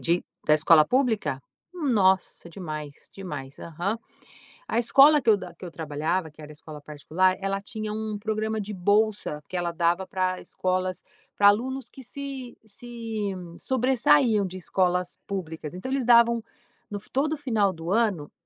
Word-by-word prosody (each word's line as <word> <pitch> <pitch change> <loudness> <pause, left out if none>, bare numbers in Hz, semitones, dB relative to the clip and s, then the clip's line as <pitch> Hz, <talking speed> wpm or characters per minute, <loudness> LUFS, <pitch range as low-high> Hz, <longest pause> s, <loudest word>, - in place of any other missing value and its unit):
de 170 +1 +1 0.2
-da 150 - +6
escola 155 0 +6
pública? 225 - +1 0.3
Nossa! 205 - +1
Demais, 155 -5 -8
demais, 145 -8 -7
aham. 175 +7 -3 0.7
A - - -1
escola 275 +6 +6
que 245 - -14
eu 220 - +7
da 185 -3 -8
que 180 - -10
eu 175 - -7
trabalhava, 160 +2 -2
que 150 - -25
era 150 - -10
a - - -10
escola 150 0 -10
particular, 155 +6 0
ela 195 0 -1
tinha 215 +1 -6
um 215 0 -3
programa 220 0 -2
de 205 - -6
bolsa 205 -5 +1
que 185 - -3
ela 175 -1 -1
dava 170 +2 +1
pra 185 -1 -1
escolas 185 0 -2 0.3
pra 200 - +5
alunos 260 +6 +1
que 265 - -12
se 270 -1 -7
se 220 -1 -5 0.3
sobressaíam 255 -3 +3
de 185 0 -6
escolas 180 -1 0
públicas, 165 -5 -5
então, 190 +9 -6
eles 270 -3 0
davam 235 -1 +5 0.5
no 205 -1 -4
todo 300 +4 +1
final 220 -9 +1
do 165 +1 -7
ano, 205 -9 +1
195 Hz, 160 wpm, -26 LUFS, 170-230 Hz, 0.7 s, eu